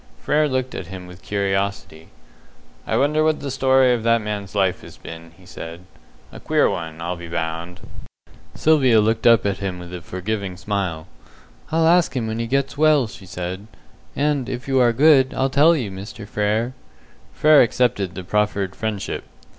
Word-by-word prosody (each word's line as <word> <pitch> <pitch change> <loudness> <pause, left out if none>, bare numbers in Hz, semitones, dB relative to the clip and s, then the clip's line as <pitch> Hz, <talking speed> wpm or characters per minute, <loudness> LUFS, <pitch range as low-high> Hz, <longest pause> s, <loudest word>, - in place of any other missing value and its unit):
Frere 150 - +1
looked 130 -1 -2
at 90 - -6
him 95 0 -8
with 90 0 -13
curiosity. 100 -5 -2 0.8
"I - - 0
wonder 150 +2 +2
what 155 -1 +1
the 140 -1 -5
story 130 -1 +3
of 120 - -1
that 115 +1 +3
man's 105 -2 -5
life 95 -2 +1
has - - -13
been," 80 0 -10
he 95 - -19
said. 85 -2 -9 0.5
"A - - -10
queer - - +2
one, 80 -1 -4
I'll 85 +2 -3
be 85 0 -9
bound." 85 +1 -4 0.7
Sylvia 135 -8 +4
looked 110 +2 +2
up 115 -2 +5
at 100 -2 -1
him 95 -2 -3
with 90 0 -10
a 90 - -6
forgiving 95 +1 -4
smile. 95 -7 -3 0.7
"I'll 160 +1 +2
ask 170 -5 +3
him 120 - -1
when 110 +1 -3
he 115 - -2
gets 135 +2 -1
well," 155 -4 +4
she 100 -3 -11
said, 90 +3 -6 0.5
"and 145 -3 0
if 130 0 -5
you 135 -1 +2
are 120 -2 +5
good, 135 +1 +4
I'll 135 0 0
tell 155 +5 +5
you, 120 -10 -3
Mr. 100 +2 -9
Frere." 110 +4 -1 0.6
Frere 155 -1 +5
accepted 115 -6 +1
the 95 - -6
proffered 100 -1 -1
friendship. 110 -3 -4
105 Hz, 180 wpm, -21 LUFS, 95-130 Hz, 0.8 s, up